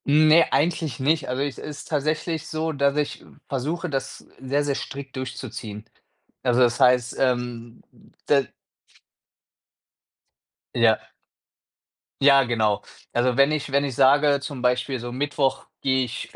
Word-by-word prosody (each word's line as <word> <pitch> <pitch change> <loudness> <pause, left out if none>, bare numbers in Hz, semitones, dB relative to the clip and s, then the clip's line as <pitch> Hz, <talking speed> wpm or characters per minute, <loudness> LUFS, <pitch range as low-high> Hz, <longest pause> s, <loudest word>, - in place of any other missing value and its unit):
Ne, 155 +3 +5
eigentlich 155 -2 0
nicht. 150 +2 +1
Also, 130 +2 -1
ich 140 -2 -4
es - - -10
ist 150 -1 -8
tatsächlich 155 +1 -1
so, 160 0 -2
dass 140 -1 +1
ich 150 -1 -1
v - - -19 0.2
versuche, 155 +7 -3
das 135 -2 -5
sehr, 140 +2 -1
sehr 145 -1 0
strikt 135 0 -7
durchzuziehen. 115 -5 -6 0.6
Also, 125 0 +2
das 120 -1 +3
heißt, 125 -1 +3
ähm, 120 -2 -2 0.4
da 140 -1 +4 2.3
Ja. 115 -2 +3 1.2
Ja, 140 -1 +7
genau. 110 -4 0 0.3
Also, 120 +1 +1
wenn 140 +3 +4
ich 145 -2 -2
wenn 140 +1 +2
ich 135 -4 -3
sage 140 +2 +4
zum 140 -2 -6
Beispiel 125 +1 0
so 120 +1 -6
Mittwoch 140 +1 -1 0.2
gehe 130 -1 +2
ich 120 0 -7
135 Hz, 140 wpm, -24 LUFS, 125-145 Hz, 2.3 s, Ja